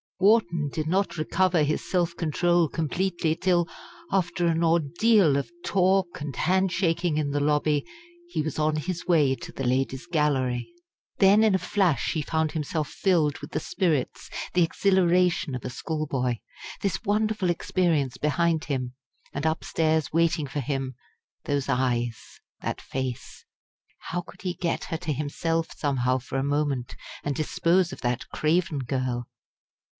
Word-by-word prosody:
Wharton 180 Hz, -7 st, +3 dB
did 155 Hz, +2 st, -3 dB
not 190 Hz, +2 st, 0 dB
recover 170 Hz, +1 st, +2 dB
his 150 Hz, +1 st, -1 dB
self 175 Hz, -2 st, 0 dB
control 175 Hz, +1 st, +2 dB
completely 165 Hz, +2 st, -1 dB
till, 175 Hz, -1 st, +2 dB, 0.4 s
after 175 Hz, -2 st, +1 dB
an 165 Hz, 0 st, +1 dB
ordeal 170 Hz, +2 st, +4 dB
of 140 Hz, -, -2 dB
talk 190 Hz, -3 st, +1 dB
and 145 Hz, -3 st, -5 dB
handshaking 175 Hz, -1 st, +1 dB
in 145 Hz, -2 st, 0 dB
the 145 Hz, -, 0 dB
lobby, 150 Hz, 0 st, +1 dB, 0.4 s
he 345 Hz, -, -1 dB
was 155 Hz, -2 st, -4 dB
on 155 Hz, 0 st, +2 dB
his 180 Hz, +3 st, -3 dB
way 155 Hz, -7 st, +4 dB
to -, -, -9 dB
the 135 Hz, -, -5 dB
Ladies' 130 Hz, +3 st, 0 dB
Gallery. 145 Hz, -, 0 dB, 0.4 s
Then 200 Hz, +2 st, +6 dB
in 215 Hz, -2 st, +4 dB
a -, -, +4 dB
flash 180 Hz, -4 st, +1 dB
he 155 Hz, -, -1 dB
found 160 Hz, +1 st, 0 dB
himself 155 Hz, -1 st, -2 dB
filled 160 Hz, -7 st, +1 dB
with -, -, -9 dB
the -, -, -1 dB
spirits, 160 Hz, -9 st, -1 dB, 0.2 s
the 180 Hz, -, +4 dB
exhilaration, 180 Hz, -3 st, +2 dB
of 125 Hz, -, -6 dB
a -, -, -2 dB
schoolboy. 135 Hz, -4 st, -2 dB, 0.4 s
This 200 Hz, +2 st, -1 dB
wonderful 210 Hz, -2 st, +1 dB
experience 165 Hz, -7 st, 0 dB
behind 160 Hz, +2 st, +1 dB
him! 130 Hz, -4 st, -2 dB, 0.4 s
and 140 Hz, +2 st, -3 dB
upstairs, 160 Hz, -1 st, +1 dB
waiting 165 Hz, -1 st, +2 dB
for 135 Hz, +2 st, -4 dB
him, 135 Hz, -1 st, -3 dB, 0.5 s
those 145 Hz, -2 st, -1 dB
eyes, 120 Hz, -2 st, 0 dB, 0.4 s
that -, -, -3 dB
face! 130 Hz, -2 st, -5 dB, 0.6 s
How 175 Hz, +2 st, -1 dB
could -, -, -15 dB
he 180 Hz, -2 st, -1 dB
get 170 Hz, -2 st, -2 dB
her 160 Hz, -, -3 dB
to 160 Hz, -2 st, -2 dB
himself 165 Hz, +3 st, -1 dB
somehow 130 Hz, -3 st, +1 dB
for 130 Hz, +1 st, -5 dB
a 135 Hz, -, 0 dB
moment 140 Hz, -3 st, -1 dB, 0.3 s
and 145 Hz, -, -1 dB
dispose 170 Hz, +4 st, +2 dB
of -, -, -9 dB
that 120 Hz, +2 st, -1 dB
Craven 160 Hz, -1 st, +1 dB
girl? 125 Hz, -2 st, -2 dB
160 Hz, 150 wpm, -26 LUFS, 140-175 Hz, 0.6 s, Then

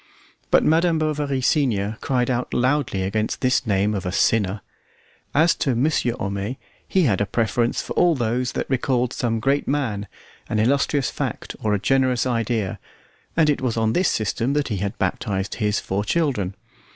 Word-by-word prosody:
But -, -, +4 dB
Madame 165 Hz, +1 st, +3 dB
Bovary, 150 Hz, -3 st, -1 dB
senior, 110 Hz, -7 st, +1 dB
cried 125 Hz, -2 st, 0 dB
out 125 Hz, 0 st, -2 dB
loudly 125 Hz, -6 st, +1 dB
against 105 Hz, +3 st, -2 dB
this 130 Hz, -1 st, +1 dB
name 100 Hz, +1 st, +2 dB
of 100 Hz, -3 st, -2 dB
a 90 Hz, -, -2 dB
sinner. 100 Hz, 0 st, +1 dB, 0.7 s
As 160 Hz, +3 st, +4 dB
to 130 Hz, -4 st, 0 dB
Monsieur 125 Hz, -2 st, +1 dB
Homais, 100 Hz, +3 st, -3 dB, 0.3 s
he 190 Hz, -, +2 dB
had 105 Hz, -9 st, +2 dB
a 105 Hz, -, +1 dB
preference 115 Hz, +3 st, 0 dB
for -, -, -5 dB
all 175 Hz, -2 st, +3 dB
those 125 Hz, 0 st, -1 dB
that -, -, -2 dB
recalled 125 Hz, -1 st, 0 dB
some 115 Hz, -2 st, -1 dB
great 135 Hz, +5 st, +1 dB
man, 115 Hz, -8 st, -1 dB, 0.4 s
an -, -, -1 dB
illustrious 140 Hz, +4 st, +1 dB
fact, -, -, -4 dB
or 105 Hz, -1 st, +1 dB
a -, -, -1 dB
generous 130 Hz, +2 st, +2 dB
idea, 115 Hz, -4 st, -1 dB, 0.6 s
and 160 Hz, -2 st, +5 dB
it 145 Hz, -3 st, +1 dB
was 120 Hz, -3 st, -1 dB
on 110 Hz, 0 st, +1 dB
this 180 Hz, 0 st, +2 dB
system 115 Hz, +5 st, -1 dB
that 145 Hz, -1 st, 0 dB
he 105 Hz, -, -1 dB
had 100 Hz, +1 st, -3 dB
baptized 95 Hz, +1 st, -2 dB
his 105 Hz, 0 st, +1 dB
four 100 Hz, +2 st, -2 dB
children. 105 Hz, -, 0 dB
120 Hz, 175 wpm, -22 LUFS, 105-140 Hz, 0.7 s, and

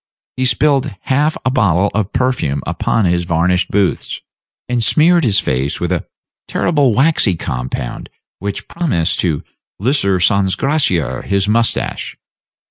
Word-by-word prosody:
He 130 Hz, -, -1 dB
spilled 135 Hz, 0 st, +2 dB
half 145 Hz, +4 st, +1 dB
a 130 Hz, -, +2 dB
bottleful 100 Hz, -, +2 dB
of 105 Hz, -2 st, -1 dB
perfume 125 Hz, -, -1 dB
upon 110 Hz, -, 0 dB
his 85 Hz, 0 st, +1 dB
varnished 90 Hz, +2 st, +1 dB
boots, 100 Hz, -2 st, -1 dB, 0.5 s
and 125 Hz, -2 st, 0 dB
smeared 170 Hz, +6 st, +4 dB
his 105 Hz, -6 st, +3 dB
face 65 Hz, +2 st, -1 dB
with 85 Hz, +1 st, -2 dB
a 90 Hz, -, -2 dB, 0.4 s
terrible 145 Hz, -9 st, +1 dB
waxy 135 Hz, -, +3 dB
compound 65 Hz, -4 st, -5 dB, 0.3 s
which 100 Hz, 0 st, -5 dB
promised 150 Hz, -, -1 dB
to 80 Hz, -5 st, 0 dB, 0.3 s
lisser 100 Hz, -5 st, +1 dB
sans 95 Hz, +1 st, +2 dB
graisser 95 Hz, -, 0 dB
his 100 Hz, 0 st, 0 dB
mustache. 115 Hz, +2 st, -1 dB
100 Hz, 130 wpm, -16 LUFS, 85-130 Hz, 0.5 s, smeared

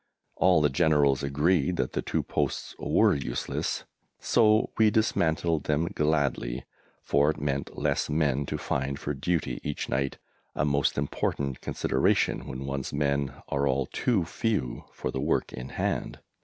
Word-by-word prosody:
All 90 Hz, -4 st, +4 dB
the 75 Hz, -, +4 dB
generals 70 Hz, -2 st, +3 dB
agreed 75 Hz, +4 st, +2 dB
that -, -, -1 dB
the -, -, -1 dB
two -, -, -1 dB
posts -, -, -2 dB
were -, -, +3 dB
useless, 65 Hz, -3 st, -2 dB, 0.4 s
so 110 Hz, -2 st, +3 dB
we 110 Hz, -1 st, +6 dB
dismantled 85 Hz, -7 st, +1 dB
them 75 Hz, +3 st, +1 dB
gladly, 70 Hz, -5 st, 0 dB, 0.4 s
for 70 Hz, +1 st, +3 dB
it 75 Hz, -, -2 dB
meant 70 Hz, -1 st, -2 dB
less -, -, 0 dB
men 70 Hz, -2 st, +1 dB
to -, -, -2 dB
find 70 Hz, +1 st, -2 dB
for 75 Hz, 0 st, -3 dB
duty 80 Hz, +3 st, -1 dB
each 75 Hz, -, -3 dB
night 70 Hz, +2 st, -1 dB, 0.4 s
a 70 Hz, -, +1 dB
most 70 Hz, -1 st, +1 dB
important 70 Hz, -1 st, -2 dB
consideration -, -, +1 dB
when 65 Hz, +1 st, -5 dB
one's 70 Hz, -1 st, -3 dB
men 70 Hz, -1 st, 0 dB, 0.2 s
are 70 Hz, 0 st, +1 dB
all 70 Hz, 0 st, +1 dB
too 105 Hz, -, 0 dB
few 80 Hz, -, -2 dB
for -, -, -4 dB
the 65 Hz, -, -3 dB
work 75 Hz, +3 st, 0 dB
in 65 Hz, +1 st, -6 dB
hand. -, -, -2 dB
70 Hz, 155 wpm, -28 LUFS, 70-80 Hz, 0.4 s, we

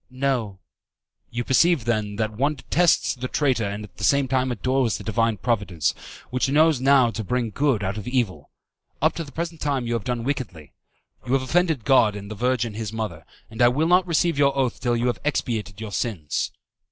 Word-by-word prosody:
"No." 130 Hz, -6 st, -1 dB, 0.7 s
"You 120 Hz, +1 st, -3 dB
perceive, 145 Hz, +1 st, +3 dB
then, 110 Hz, -3 st, -1 dB
that 110 Hz, 0 st, -1 dB
one 140 Hz, +7 st, 0 dB
detests 175 Hz, +3 st, +2 dB
the 130 Hz, 0 st, -5 dB
traitor 130 Hz, -6 st, +1 dB
and 100 Hz, +1 st, -4 dB
at 100 Hz, -4 st, -13 dB
the -, -, -7 dB
same 140 Hz, -1 st, +3 dB
time 130 Hz, 0 st, +1 dB
adores 125 Hz, +1 st, 0 dB
the -, -, -9 dB
Divine 115 Hz, 0 st, 0 dB
Providence, 105 Hz, -, 0 dB, 0.4 s
which 125 Hz, +1 st, 0 dB
knows 155 Hz, -1 st, +4 dB
how 135 Hz, -3 st, +5 dB
to 110 Hz, -, -4 dB
bring 120 Hz, +1 st, -1 dB
good 135 Hz, -3 st, +1 dB
out 100 Hz, +3 st, -2 dB
of 105 Hz, -, -8 dB
evil. 115 Hz, -, -1 dB, 0.5 s
Up 155 Hz, +2 st, +2 dB
to 165 Hz, -, -4 dB
the 145 Hz, -, -12 dB
present 165 Hz, 0 st, -5 dB
time 140 Hz, -4 st, -1 dB
you 120 Hz, -, -2 dB
have 115 Hz, -3 st, -2 dB
done 120 Hz, -2 st, -2 dB
wickedly. 115 Hz, -, -4 dB, 0.5 s
You 125 Hz, -, 0 dB
have 135 Hz, -1 st, +2 dB
offended 160 Hz, -, +1 dB
God 115 Hz, -6 st, +4 dB
and 100 Hz, 0 st, -8 dB
the -, -, -5 dB
Virgin 120 Hz, 0 st, 0 dB
His 110 Hz, -1 st, -4 dB
Mother, 105 Hz, -8 st, -5 dB, 0.2 s
and 110 Hz, +2 st, -6 dB
I 120 Hz, -, +7 dB
will 140 Hz, +6 st, +2 dB
not 180 Hz, +1 st, +4 dB
receive 165 Hz, -2 st, +1 dB
your 140 Hz, -1 st, +3 dB
oath 130 Hz, -3 st, 0 dB
till 120 Hz, -1 st, 0 dB
you 120 Hz, -, -1 dB
have 125 Hz, -, 0 dB
expiated 110 Hz, -8 st, -2 dB
your 110 Hz, -2 st, -6 dB
sins." 95 Hz, -, -2 dB
125 Hz, 205 wpm, -24 LUFS, 110-140 Hz, 0.7 s, I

